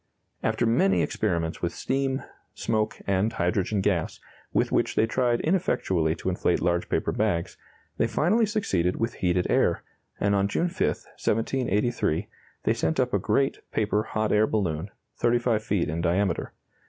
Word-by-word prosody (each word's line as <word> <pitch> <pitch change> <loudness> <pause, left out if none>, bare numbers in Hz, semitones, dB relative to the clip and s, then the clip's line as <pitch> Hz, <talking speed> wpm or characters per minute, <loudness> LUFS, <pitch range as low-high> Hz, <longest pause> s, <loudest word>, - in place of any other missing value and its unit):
After 120 - +1
many 130 +13 +3
experiments 85 -6 -1
with 85 -1 -2
steam, 135 0 -1 0.3
smoke, 110 -2 -1
and 100 +3 +1
hydrogen 95 +2 0
gas, 90 -5 0 0.3
with - - +1
which - - +1
they 110 - +4
tried 120 +1 +1
ineffectually 95 - +1
to - - -3
inflate 90 -1 +1
large 85 0 0
paper - - 0
bags, 85 0 -1 0.4
they 115 - +2
finally 185 - +2
succeeded 95 - 0
with 115 +1 -1
heated 90 0 0
air, - - +2 0.4
and 100 0 +2
on 100 0 +2
June 170 - 0
5, - - 0
1783, 110 -5 -1 0.4
they - - +3
sent 80 0 -1
up 125 -1 +1
a 100 - +3
great 115 +8 +1
paper 105 -1 +1
hot 110 -1 -2
air 105 +1 +4
balloon, 90 -4 -1 0.3
35 120 -2 +2
feet 100 -5 0
in 80 +2 -2
diameter. 90 +1 0
105 Hz, 155 wpm, -26 LUFS, 90-120 Hz, 0.4 s, they